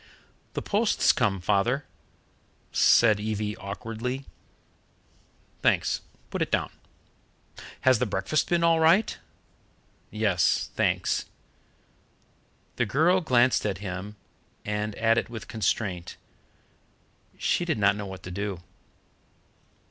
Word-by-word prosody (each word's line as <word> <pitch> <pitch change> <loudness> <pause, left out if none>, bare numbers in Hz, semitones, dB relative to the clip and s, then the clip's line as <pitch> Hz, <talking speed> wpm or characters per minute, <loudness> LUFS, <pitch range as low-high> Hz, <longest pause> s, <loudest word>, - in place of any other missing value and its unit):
"The - - -4
post's 210 +2 +3
come, 100 -5 0
Father," 105 +9 +1 0.9
said 110 -3 +5
Evie 105 0 -2
awkwardly. 115 +6 -5 1.4
"Thanks. - - +2 0.3
Put - - -3
it - - 0
down." - - 0 1.1
"Has 130 -3 +4
the 125 - 0
breakfast 100 +10 -1
been 175 -1 +2
all 165 -1 +4
right?" 170 +7 +4 0.9
"Yes, 105 -5 +1
thanks." - - 0 1.5
The - - +1
girl 175 +6 +3
glanced 125 -5 +3
at 100 -4 -1
him 95 +1 -6 0.5
and 105 0 -2
at 115 0 +3
it - - -6
with 115 -2 -8
constraint. 100 -7 -2 1.2
She - - +1
did 165 -6 -1
not 100 -1 +3
know 100 -1 -5
what 95 -1 -9
to 90 - -7
do. 100 -2 -4
110 Hz, 110 wpm, -26 LUFS, 100-130 Hz, 1.5 s, said